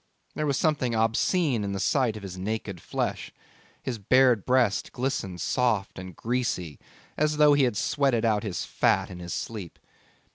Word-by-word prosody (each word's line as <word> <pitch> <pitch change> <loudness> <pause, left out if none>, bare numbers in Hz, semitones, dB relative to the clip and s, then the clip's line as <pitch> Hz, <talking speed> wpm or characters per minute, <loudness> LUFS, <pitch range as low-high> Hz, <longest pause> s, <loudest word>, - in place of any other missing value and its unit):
There 155 - -2
was 140 -1 +1
something 135 -7 +1
obscene 115 - +1
in 100 -1 -3
the 100 - -3
sight 115 +2 +1
of 105 - -10
his 95 -2 -7
naked 100 -2 -4
flesh. - - -3 0.5
His 120 -4 -3
bared 125 0 +3
breast 125 -5 +2
glistened 110 -9 -3
soft 110 -3 0
and 95 -2 -9
greasy 115 - -2 0.4
as 150 0 +1
though 150 -1 +6
he 145 -2 +4
had 120 -5 -1
sweated 135 -5 +1
out 105 -2 +2
his 100 -4 -4
fat - - +1
in 90 - -8
his 85 0 -5
sleep. 105 -7 -6
115 Hz, 170 wpm, -27 LUFS, 100-130 Hz, 0.5 s, though